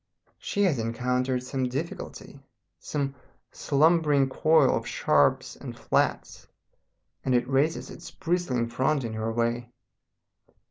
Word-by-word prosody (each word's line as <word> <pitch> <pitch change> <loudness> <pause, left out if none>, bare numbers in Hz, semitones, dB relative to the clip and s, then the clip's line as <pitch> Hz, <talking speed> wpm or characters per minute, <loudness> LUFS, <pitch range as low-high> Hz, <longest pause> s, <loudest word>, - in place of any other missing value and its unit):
She 205 - -1
has 165 -10 +2
encountered 125 +2 -1
some 130 0 -2
difficulty, 140 0 -6 0.4
some 140 -2 -3 0.4
slumbering 150 -2 +3
coil 155 +4 +4
of - - -3
sharps 75 -1 +2
and - - -9
flats, - - -1 0.8
and 130 - +1
it 120 0 +1
raises 140 +4 0
its - - -10
bristling 165 -9 -1
front 130 +4 0
in 115 -2 -4
her 110 +1 -2
way.... 120 +1 -1
130 Hz, 120 wpm, -27 LUFS, 120-150 Hz, 0.8 s, coil